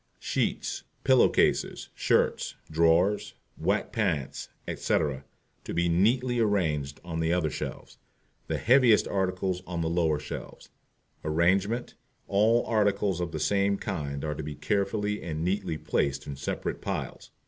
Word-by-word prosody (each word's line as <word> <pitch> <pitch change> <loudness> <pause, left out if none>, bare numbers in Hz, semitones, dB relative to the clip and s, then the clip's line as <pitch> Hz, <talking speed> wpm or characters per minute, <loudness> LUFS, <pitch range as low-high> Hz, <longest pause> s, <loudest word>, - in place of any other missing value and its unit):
SHEETS, - - -2 0.2
PILLOW 130 -1 +5
CASES, - - +1
SHIRTS, - - +1 0.2
DRAWERS, 85 +5 +3 0.2
WHITE - - 0
PANTS, 70 -3 -1 0.2
etc., 70 -4 -1 0.4
to - - -5
be 85 0 +2
neatly 120 +8 +2
arranged 80 -10 0
on 80 -2 -4
the 80 0 +1
other 85 -4 +1
shelves, - - -6 0.5
the - - -1
heaviest 125 -3 +5
articles 95 -1 -1
on 85 -2 -3
the 80 - 0
lower 80 -3 +2
shelves. - - -8 0.5
Arrangement 95 +9 +1 0.3
All 110 +4 +3
articles 100 -4 +1
of 85 -2 -2
the 80 - -4
same 100 +4 +2
kind 70 -8 -4
are 75 - -1
to 75 - -5
be 75 0 -6
carefully 105 +6 -1
and 80 -2 -4
neatly 90 -4 -1
placed 70 -2 -1
in 70 - -5
separate 70 - -4
piles. - - -4
90 Hz, 135 wpm, -28 LUFS, 80-105 Hz, 0.5 s, PILLOW